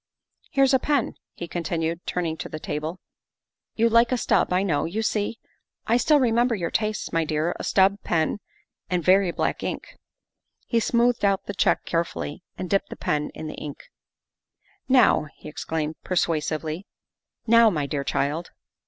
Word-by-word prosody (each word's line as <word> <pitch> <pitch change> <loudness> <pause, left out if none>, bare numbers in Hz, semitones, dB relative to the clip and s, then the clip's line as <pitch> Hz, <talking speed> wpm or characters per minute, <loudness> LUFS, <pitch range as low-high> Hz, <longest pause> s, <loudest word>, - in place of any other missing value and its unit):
' - - -55
Here's 275 -1 +4
a 265 - +5
pen," 285 -2 0 0.2
he 170 - -6
continued, 165 0 -3
turning 170 -3 -1
to - - -6
the 155 - -6
table; 155 +4 -4 0.4
" - - -65
you 230 +1 +3
like 230 +1 +4
a 255 - +2
stub, 230 - +2
I 180 +1 +2
know. 165 -7 0
You 210 +7 -2
see, 215 +1 -1 0.5
I 230 - +3
still 295 +4 +4
remember 240 -1 +2
your 170 -5 -3
tastes, 215 -4 -2
my 165 0 +2
dear 155 +2 -1
a - - -4
stub 195 +1 +3
pen 160 +4 0 0.5
and 180 -2 0
very 190 +1 +4
black - - -1
ink. - - -5 0.2
' - - -61
' - - -64 0.2
He 235 - +1
smoothed 235 +1 +2
out 195 -1 +2
the 205 - -4
check - - +1
carefully 165 -1 -2 0.2
and 185 - -4
dipped 195 +2 0
the - - -7
pen 150 0 -1
in - - -7
the 155 - -5
ink. 145 -2 -9 0.5
" - - -40
Now," 185 -9 +4
he - - -12
exclaimed 155 0 -4
persuasively, 160 0 -1 0.3
" - - -59
now, 230 0 +6
my 150 -7 -1
dear 140 0 -2
child." 145 +6 -1
180 Hz, 185 wpm, -25 LUFS, 160-225 Hz, 0.5 s, now